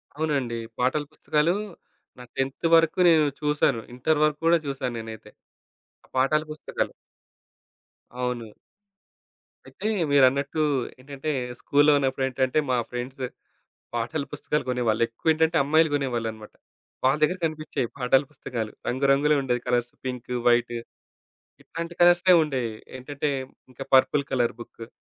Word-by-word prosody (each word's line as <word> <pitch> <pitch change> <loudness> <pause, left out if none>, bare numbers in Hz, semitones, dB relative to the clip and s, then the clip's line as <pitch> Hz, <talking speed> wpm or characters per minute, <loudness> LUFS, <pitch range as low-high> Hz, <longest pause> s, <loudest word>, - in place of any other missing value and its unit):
అవునండి. 140 -6 -1 0.2
పాటల 130 +4 +1
పుస్తకాలు 155 +3 +1 0.6
నా 125 - -9
టెంతు 135 +5 -1
వరకు 165 +2 +3
నేను 160 -2 +5 0.2
చూసాను. 150 -6 +1
ఇంటరు 150 +5 +1
వరకు 150 -1 -1
గూడా 170 0 +5
చూసాను 135 -3 -3
నేనైతే 110 -1 -9 0.8
ఆ - - -32
పాటల 145 +4 +3
పుస్తకాలు. 155 - -3 1.2
అవును. 125 -2 -3 1.2
అయితే 215 - -6 0.2
మీరన్నట్టు 140 +2 +3 0.4
ఏంటంటే, 140 +3 -6 0.3
స్కూలులో 145 +1 +4
ఉన్నప్పుడేంటంటే 130 0 0
మా 125 - +2
ఫ్రెండ్స్ 125 +2 -5 0.7
పాటల 120 +5 -2
పుస్తకాలు 150 +1 -2
కొనేవాళ్ళు. 120 -3 0
ఎక్కువేంటంటే 160 +7 +1
అమ్మాయిలు 155 +3 +3
కొనేవాళ్ళన్నమాట. 115 -6 -3 0.5
వాళ్ళ 135 +3 +3
దగ్గర 180 +5 +3
కనిపిచ్చేవి 155 -5 -3
పాటల 135 +1 +3
పుస్తకాలు 115 -5 -5 0.2
రంగు 130 +3 0
రంగులుండేవి 135 -4 +2
కలర్స్. 120 0 0
పింకు, 125 -1 -4
వైటు 120 0 +3 0.9
ఇట్లాంటి 170 +1 -6
కలర్స్. 175 +1 +6 0.2
ఉండేవి. 130 -7 -2 0.2
ఏంటంటే 140 +3 -3 0.4
ఇంకా 130 +2 -8
పర్పుల్ 140 +2 +4
కలర్ 120 -4 +1
బుక్కు. 115 -1 -10
135 Hz, 115 wpm, -25 LUFS, 125-150 Hz, 1.2 s, కలర్స్